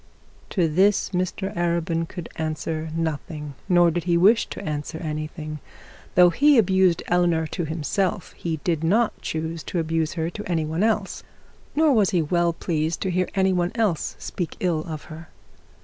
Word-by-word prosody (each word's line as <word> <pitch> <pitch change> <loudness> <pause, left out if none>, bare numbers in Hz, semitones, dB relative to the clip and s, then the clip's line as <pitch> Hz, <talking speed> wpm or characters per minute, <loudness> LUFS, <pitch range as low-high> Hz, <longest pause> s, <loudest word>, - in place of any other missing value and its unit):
To 175 -5 +1
this 190 +7 +2
Mr 185 +2 -2
Arabin 170 -1 0
could 175 -3 -7
answer 160 0 -3
nothing, 155 -2 -3 0.2
nor 175 -2 +5
did 175 +1 -3
he 170 -1 +3
wish 210 +7 +5
to - - -7
answer 150 +1 -3
anything. 155 -1 -5 0.6
Though 180 0 +7
he 285 - +5
abused 190 -4 +3
Eleanor 175 -2 +2
to 170 +2 -3
himself, 170 +4 -1
he 165 -2 -3
did 165 -3 0
not 215 +7 +2
choose 160 +1 -3
to - - -3
abuse 160 -1 0
to 170 +5 -3
any 165 -3 0
one 160 +3 -2
else, 215 -2 0 0.5
nor 310 -1 +4
was 210 -5 +4
he 175 - +2
well 170 +2 +2
pleased 165 -1 -2
to 190 - -1
hear 185 +1 0
any 190 -1 +3
one 175 -1 0
else 215 -9 0
speak 175 -4 -5
ill 175 -4 +1
of 155 -3 -6
her. 160 0 -10
170 Hz, 165 wpm, -24 LUFS, 160-185 Hz, 0.6 s, Though